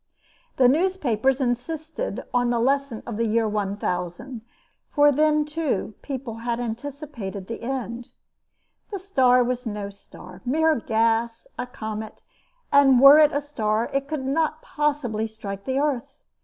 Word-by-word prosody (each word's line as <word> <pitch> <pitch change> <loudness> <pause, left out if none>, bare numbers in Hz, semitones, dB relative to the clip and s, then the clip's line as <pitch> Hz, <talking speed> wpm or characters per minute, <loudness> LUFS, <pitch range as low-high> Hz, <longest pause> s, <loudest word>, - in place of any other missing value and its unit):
The 255 - +6
newspapers 270 - +1
insisted 310 - -3
on 245 -1 +2
the 240 - +1
lesson 275 -1 0
of 230 -3 -5
the 230 0 +1
year 225 +1 +2
1000 200 +2 -3 0.5
for 290 -1 +5
then, 300 +1 +3
too, 300 -9 -2
people 260 -5 -5
had 235 +1 -2
anticipated 240 -4 -5
the 230 +3 -6
end. 240 -1 -4 0.8
The 400 - -3
star 260 -10 +3
was 250 0 -2
no 205 -2 -4
star 185 -2 -14
mere 315 +3 +2
gas 230 +1 0
a 250 - -2
comet; 220 -2 -7 0.5
and 270 -3 +6
were 275 +3 +9
it 305 -1 +6
a 285 - 0
star 225 -6 -1
it 275 0 -1
could 295 -3 -3
not 310 +3 0
possibly 285 -8 -1
strike 200 -3 -8
the 265 0 -1
earth. 280 -4 -1
250 Hz, 140 wpm, -24 LUFS, 225-290 Hz, 0.8 s, were